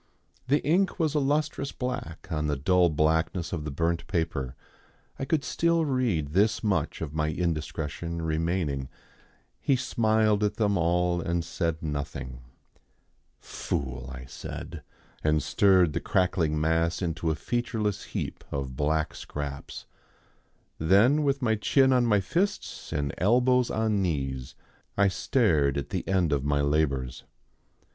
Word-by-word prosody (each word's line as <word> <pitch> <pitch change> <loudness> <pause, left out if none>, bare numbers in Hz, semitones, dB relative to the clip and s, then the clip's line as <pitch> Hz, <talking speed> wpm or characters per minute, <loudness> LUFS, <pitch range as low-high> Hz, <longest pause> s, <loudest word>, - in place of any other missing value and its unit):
The 145 +3 +2
ink 185 +6 +2
was 155 -3 +1
a 150 - +2
lustrous 145 0 0
black 125 - -5
on 75 -1 -1
the 75 - 0
dull 90 +5 +3
blackness 80 +3 0
of 75 -3 -3
the - - -3
burnt 85 +3 -1
paper. 80 -8 -2 0.6
I 135 - -2
could 150 0 +1
still 170 +3 +1
read 120 - 0
this 100 +9 +2
much 105 -3 0
of 75 -3 -4
my 75 0 0
indiscretion 80 0 -3
remaining, 80 -4 -1 0.7
"He 140 - +2
smiled 110 -4 +2
at 105 0 +1
them 105 -2 +1
all 85 0 +1
and 85 0 -1
said 85 -1 -2
nothing." 70 -4 -4 1.0
"Fool!" 65 -1 -4
I 65 -1 -8
said, 80 +5 -7 0.4
and 75 -1 +2
stirred 95 -6 +4
the - - 0
crackling 85 -4 +1
mass 80 +3 +1
into 85 -1 -1
a 80 - +1
featureless 110 -2 -2
heap - - -5
of 70 -2 -3
black 75 +2 0
scraps. 70 -1 -6 0.9
Then 100 - +4
with 140 -2 0
my 110 -2 +3
chin 130 +5 +3
on 125 -2 +3
my 105 -3 +3
fists 185 - -2
and 70 -1 -1
elbows 125 +5 +3
on 110 -2 +1
knees 65 -7 -2 0.4
I 100 0 +5
stared 85 - +2
at 70 - -3
the - - -3
end 90 -5 +2
of 70 -2 0
my 70 0 +1
labours. 70 -3 0
85 Hz, 140 wpm, -27 LUFS, 75-110 Hz, 1.0 s, I